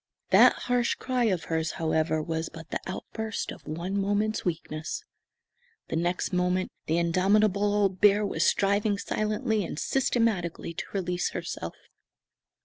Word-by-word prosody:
That - - +8
harsh 245 -1 +1
cry 255 -2 0
of 185 -7 +1
hers, 160 0 -1
however, 160 -1 0
was 160 0 -2
but 165 0 -11
the - - -1
outburst 220 +3 -4
of - - -12
one 170 +5 -3
moment's 205 +2 0
weakness. 160 -2 -3 0.9
The - - -2
next 175 +3 -1
moment 180 +1 +1 0.2
the 160 - +2
indomitable 200 +4 +3
old 195 -3 +1
bear 205 0 +5
was 200 - 0
striving 200 +1 +2
silently 215 +1 -1
and 165 - -5
systematically 220 -9 0
to - - -5
release 180 -2 -1
herself. 170 - -5
185 Hz, 140 wpm, -28 LUFS, 165-210 Hz, 0.9 s, That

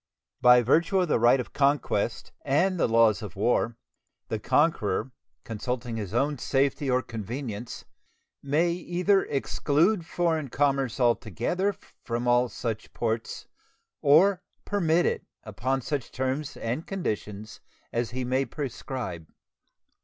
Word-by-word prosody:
By 125 0 +7
virtue 170 - +3
of 180 - -1
the - - +3
right 120 +3 +5
of 125 - -6
conquest 140 -1 0
and 175 +7 +2
the - - +3
laws 115 -1 +4
of 105 -6 -8
war, 115 +2 +1 0.5
the - - -2
conqueror, 130 +4 +1 0.3
consulting 120 +2 -4
his 100 -4 -5
own 140 +4 0
safety 140 +2 0
or 130 0 +2
convenience, 115 +1 -6 0.6
may 155 +5 +1
either 180 +3 +1
exclude 160 +7 +1
foreign 165 -4 0
commerce 135 -2 0
altogether 125 - 0 0.3
from 120 +1 -2
all 120 0 +3
such 115 -3 -5
ports 115 -1 -3 0.6
or 180 +6 +5 0.2
permit 175 -4 +2
it - - 0 0.2
upon 125 +5 -2
such 135 -1 -3
terms 135 +3 -3
and 120 +8 -3
conditions 110 - -4 0.3
as 115 -1 -1
he 125 +2 -3
may 130 +2 +1
prescribe. 125 - -5
130 Hz, 125 wpm, -27 LUFS, 115-155 Hz, 0.6 s, By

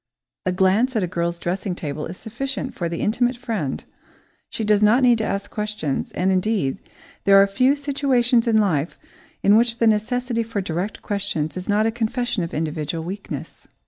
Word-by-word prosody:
A - - +3
glance 195 +8 +2
at 215 - +2
a - - 0
girl's 170 0 -2
dressing 180 +2 -3
table 150 -2 -4
is 175 +2 -8
sufficient 270 +4 -4
for 170 -2 -3
the 170 - -4
intimate 245 +3 +1
friend 220 - -3 0.6
she 225 - -4
does 210 -1 +3
not 225 +5 +5
need 240 -2 +5
to - - 0
ask 200 -1 -3
questions; 210 -10 -3
and 185 +1 +1
indeed, 185 -6 0 0.5
there 195 0 +7
are 195 - +7
few 255 +8 +2
situations 270 -4 +1
in 225 -1 +4
life 175 -7 +1 0.5
in 200 - +6
which 230 +1 +3
the 230 - +2
necessity 230 +2 +1
for 225 -2 -3
direct 185 +2 -3
questions 195 -7 -2
is 185 +2 -6
not 210 +1 +3
a 225 - +2
confession 235 -1 -1
of 165 - -5
individual 155 +1 -3
weakness. 195 +4 -7
210 Hz, 180 wpm, -22 LUFS, 180-235 Hz, 0.6 s, there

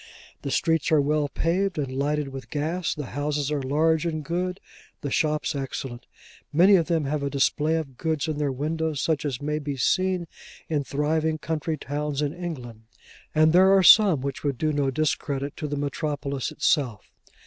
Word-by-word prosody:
The - - -4
streets 160 +2 +1
are 155 - +5
well 145 0 +1
paved, 180 +5 0
and 140 -3 -2
lighted 145 +1 0
with 135 -4 -9
gas; 160 +6 -2
the 150 -2 -5
houses 145 0 -1
are 145 -2 0
large 155 +4 +2
and 155 -3 -3
good; 180 +3 -2 0.4
the 140 - -4
shops 155 +2 0
excellent. 135 -3 -5 0.4
Many 180 +6 +6
of 170 -4 +2
them 165 -4 +1
have 145 +1 -1
a 140 - -1
display 145 +3 +1
of 140 -6 -4
goods 160 -3 -1
in 155 -2 -2
their 145 -2 0
windows, 155 +2 -2
such 155 0 0
as 140 -1 -3
may 150 +1 -1
be 145 -2 -4
seen 185 +6 +1 0.4
in 150 -3 0
thriving 155 +3 0
county 160 0 -3
towns 150 0 -3
in 145 0 -1
England; 125 -11 -7 0.5
and 155 +1 +5
there 190 +2 +6
are 190 - +4
some 190 -7 +7
which 140 +1 -4
would 140 -3 -1
do 155 +2 0
no 140 -2 +1
discredit 140 -1 -1
to 150 - -3
the 145 0 -3
metropolis 140 -2 -2
itself. 125 -8 0
150 Hz, 180 wpm, -25 LUFS, 140-160 Hz, 0.5 s, some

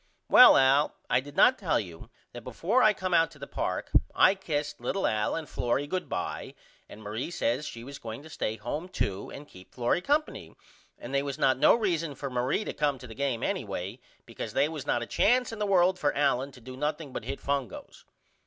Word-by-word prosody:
Well - - +9
Al 135 +3 +3 0.2
I - - +4
did 145 +2 -10
not 255 - +5
tell 180 -7 +1
you 85 -5 -9 0.2
that - - -9
before 225 +10 0
I 215 - +6
come 185 -3 -3
out 165 -1 +4
to - - -17
the - - -7
park - - -3 0.2
I - - +6
kissed 150 -7 -4
little 195 - -1
Al 105 -1 0
and 160 -2 -5
Florrie 125 +4 -1
good 180 +5 -4
by - - -4 0.3
and 110 - -12
Marie 110 +7 -4
says 145 -4 -1
she 115 - -8
was 140 +2 -9
going 115 +4 -7
to 160 - -12
stay 110 -6 -2
home 160 +9 -5
to 100 -1 -2
and 145 +1 -10
keep 90 0 -16
Florrie 125 +7 +1
Co. 295 +9 +2 0.7
and 120 - -9
they 140 - +2
was 140 0 -4
not 130 -4 +2
no - - +6
reason 170 -9 -1
for 140 -1 -6
Marie 125 - 0
to - - -4
come 145 -2 0
to 125 - -11
the 115 - -9
game 130 -1 -2
anyway 105 - -3 0.3
because 115 -2 -7
they 140 +2 +3
was 155 -3 -7
not 120 - +1
a - - -5
chance 245 - +2
in 225 - -7
the 210 - 0
world 185 -1 +3
for 145 - 0
Allen 140 -1 +1
to 125 - -14
do 130 +2 -9
nothing 150 0 -3
but - - -5
hit 135 +2 -4
fungos. 140 -6 -4
140 Hz, 220 wpm, -28 LUFS, 120-170 Hz, 0.7 s, Well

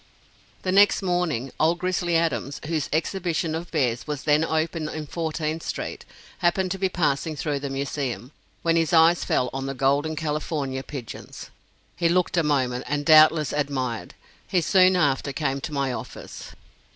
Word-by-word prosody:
The 185 - 0
next, 200 +1 +5
morning, 175 -9 -1
"Old 165 +2 +3
Grizzly 175 -1 0
Adams," 140 -4 -1
whose 155 -2 -2
exhibition 165 0 -1
of 165 +2 -4
bears 125 -6 -1
was 150 -1 -4
then 150 +1 +3
open 160 0 -1
in 155 0 -5
Fourteenth 160 0 -3
street, - - -5 0.3
happened 185 +2 +1
to 195 - -3
be 190 -1 +1
passing 155 -2 0
through 145 -1 -2
the 140 0 -4
Museum, 135 -3 -3 0.3
when 165 0 +2
his 165 +1 +1
eyes 165 +1 +5
fell 125 -1 0
on 135 0 -3
the 135 - -4
"Golden 140 +4 +1
California 150 -3 -2
Pigeons." 130 -4 -9 0.4
He 170 -1 +1
looked 180 +1 +1
a 170 - +4
moment 130 -5 0
and 145 +1 -2
doubtless 155 -1 +6
admired. 130 -5 -2 0.3
He 185 - +2
soon 185 +2 +4
after 140 -5 +1
came 135 -1 -2
to - - -5
my 140 -3 -1
office. - - -8
155 Hz, 165 wpm, -24 LUFS, 140-170 Hz, 0.4 s, doubtless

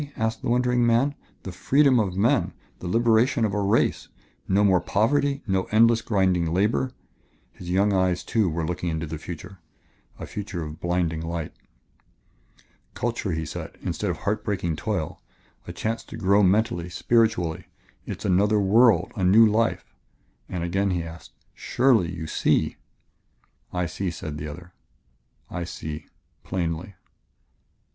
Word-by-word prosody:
asked 110 0 -1
the - - -3
wondering 125 0 +2
man. 120 +5 +3 0.3
"The 95 - -6
freedom 130 +8 +3
of 95 -4 -1
men 120 +7 +2 0.3
the 90 - -6
liberation 115 +4 +3
of 100 - -1
a 105 - 0
race. 100 +3 +1 0.4
No 100 +2 +3
more 95 -3 +4
poverty, 140 +9 +1
no 95 -4 0
endless, 115 +1 +4
grinding 95 -5 +1
labor." 105 +8 +1 0.6
His 90 - -10
young 100 +3 +2
eyes, 95 -2 +1
too, 110 -5 +1
were 80 0 -2
looking 90 +1 -3
into 80 0 -2
the 80 0 -6
future, 90 +3 -9 0.6
a - - -7
future 100 -4 -5
of 75 +1 -8
blinding 85 -2 -1
light. 85 -1 -4 1.4
"Culture," 115 -6 -2
he 80 0 -2
said, 75 - -7
"instead - - -2
of - - -2
heart 105 +2 -2
breaking 90 -5 -1
toil, 90 -2 -3 0.5
a - - -5
chance 115 +1 -3
to 115 - -9
grow 100 -1 +3
mentally, 95 -2 +2
spiritually; 90 -4 +1 0.4
it - - -4
is - - -9
another 105 +3 +3
world, 110 +4 +4
a 100 - -2
new 105 +5 +7
life 110 +1 0 0.3
" - - -40
And 90 -2 -3
again 95 +3 0
he 90 -2 -1
asked: 80 +1 -11 0.2
"Surely, 120 -10 +2
you 80 -2 -6
see?" 80 - +1 0.9
"I 90 0 -1
see," 90 +3 -3
said 80 -3 -6
the 75 - -5
other; 85 +4 -10 0.8
"I 90 0 -3
see 80 -2 -7 0.4
plainly." 90 +1 -3
95 Hz, 150 wpm, -25 LUFS, 85-110 Hz, 1.4 s, new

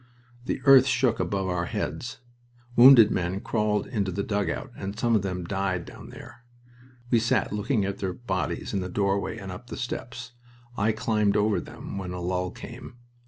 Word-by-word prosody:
The 130 - -3
earth 135 -1 +8
shook 125 -3 +2
above 95 +1 -1
our 90 -1 -1
heads. 120 0 -4 0.5
Wounded 120 -3 +9
men 90 +1 -1
crawled 105 -1 0
into 100 -6 -2
the 100 +3 -2
dugout, 105 +5 -2
and 100 +2 -6
some 115 0 +2
of 105 - +3
them 90 -2 -3
died 95 -2 -2
down - - -11
there. 120 - -12 0.7
We 120 - +5
sat 115 -2 +1
looking 105 +1 0
at 100 0 -4
their 95 -2 -2
bodies 95 -8 -3
in 100 - 0
the 90 -1 -4
doorway 100 +3 -1
and 95 -3 -7
up 90 +7 -9
the - - -7
steps. 120 -1 -5 0.4
I 110 +1 +2
climbed 110 -3 +1
over 105 0 +2
them 100 - -8
when 90 -2 -5
a 90 - -5
lull 90 +1 -1
came. 120 +5 -10
100 Hz, 180 wpm, -26 LUFS, 95-120 Hz, 0.7 s, Wounded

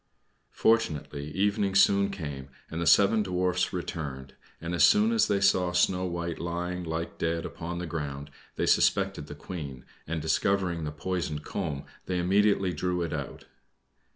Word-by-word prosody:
Fortunately, 75 -9 +1
evening 100 +3 0
soon 100 0 +5
came, 75 -8 -6 0.2
and 80 +1 -3
the 85 - -1
seven 100 +7 +5
Dwarfs 90 -1 0
returned, 70 -7 -5 0.3
and 85 +1 -4
as 85 - +3
soon 215 +2 +5
as 230 -1 +3
they 100 - +1
saw 90 -2 +3
Snow 90 +1 +2
White 85 -2 -3
lying, 90 +1 -3
like 80 0 -4
dead, 85 0 -1
upon 85 0 -5
the 90 - -3
ground, 75 -3 -5 0.2
they - - 0
suspected 75 - +2
the 75 - -8
Queen, 75 -6 -7 0.2
and 80 +1 -2
discovering 85 +1 0
the 75 - -3
poisoned 75 0 -3
comb, 75 -8 -3 0.2
they 90 - -1
immediately 95 +1 +2
drew 90 +2 -1
it 85 - -3
out. 70 -3 -6
85 Hz, 155 wpm, -28 LUFS, 75-95 Hz, 0.3 s, soon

